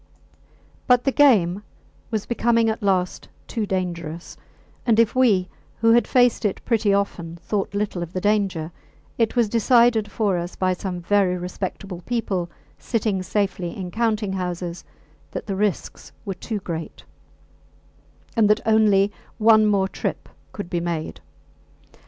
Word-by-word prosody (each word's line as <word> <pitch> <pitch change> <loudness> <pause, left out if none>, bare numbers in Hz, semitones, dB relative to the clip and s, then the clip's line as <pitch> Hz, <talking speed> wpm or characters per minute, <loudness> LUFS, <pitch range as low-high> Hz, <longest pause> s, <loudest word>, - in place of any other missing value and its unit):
But 250 -1 +5
the 270 - +2
game 205 - +4 0.5
was 220 -3 -2
becoming 230 -1 +2
at 220 - -6
last 185 -3 0 0.2
too 220 -3 -3
dangerous; 170 -3 -4 0.5
and 230 -2 +3
if 230 -1 +4
we, 210 -8 +3 0.3
who 230 0 +4
had 235 +1 +4
faced 245 -2 +3
it 205 -3 0
pretty 220 -3 +2
often, 195 -4 -1
thought 195 +3 -3
little 200 -3 -2
of 170 -1 -5
the 185 - -3
danger, 195 -5 0 0.5
it 230 +1 +1
was 240 -3 +3
decided 235 -1 +3
for 200 -5 0
us 175 +1 -6
by 185 -1 +1
some 180 -1 -5
very 185 0 +2
respectable 180 0 -5
people 195 -5 -2 0.3
sitting 215 -5 -1
safely 185 -3 -2
in 180 -2 -5
counting 220 -3 0
houses 180 -2 -4 0.5
that - - -6
the 195 - -3
risks 205 -1 -2
were 195 - -2
too 210 +4 -5
great, 165 -3 -6 1.3
and 220 -3 +4
that 210 - +2
only 210 -2 +4 0.3
one 220 -1 +5
more 200 -2 +2
trip - - -4 0.2
could 205 - -6
be 175 -1 -2
made. 170 -2 -4
200 Hz, 145 wpm, -23 LUFS, 180-225 Hz, 1.3 s, But